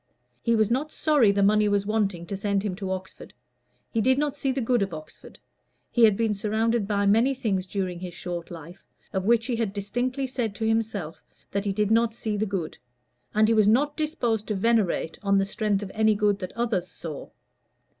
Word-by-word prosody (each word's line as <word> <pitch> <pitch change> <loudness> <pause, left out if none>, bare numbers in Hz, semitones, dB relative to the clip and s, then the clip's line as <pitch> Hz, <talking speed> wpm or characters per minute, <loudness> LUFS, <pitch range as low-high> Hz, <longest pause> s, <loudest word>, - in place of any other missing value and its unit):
He 230 -1 +2
was 220 0 +2
not 285 +5 0
sorry 290 -11 +3
the 200 0 +1
money 210 +1 +4
was 200 -1 +1
wanting 200 -5 -1
to 195 - -4
send 200 0 -1
him 205 -3 -2
to 195 -2 -4
Oxford; 190 0 -6 0.6
he 225 - +1
did 260 +4 +3
not 290 -1 0
see 270 - -1
the 265 - -2
good 245 -1 +1
of 195 -4 -2
Oxford; 155 0 -11 0.5
he 235 -2 +6
had 210 -3 +3
been 225 -2 +1
surrounded 220 +1 0
by 200 -1 +1
many 230 +7 +3
things 195 -7 -1
during 185 -3 -3
his 180 -1 -7
short 175 -1 -5
life, 170 +2 -10 0.3
of 190 0 -1
which 230 +1 +3
he 245 -2 -1
had 220 -4 -1
distinctly 245 +7 -2
said 245 -5 -3
to 220 +1 -2
himself 220 -7 -1 0.3
that 200 +1 -2
he 200 - +1
did 210 +1 0
not 230 0 +3
see 220 -2 -2
the 215 +1 -1
good, 185 -5 -4 0.6
and 215 0 +5
he 230 - +3
was 215 -2 +4
not 285 +7 +3
disposed 240 -9 -1
to 215 - -1
venerate 200 -6 +1
on 200 -1 +2
the 195 - +2
strength 205 0 -1
of 195 - -7
any 220 0 +3
good 205 -1 +1
that 185 - -6
others 225 -7 0
saw. 165 -4 -8
210 Hz, 210 wpm, -26 LUFS, 195-230 Hz, 0.6 s, he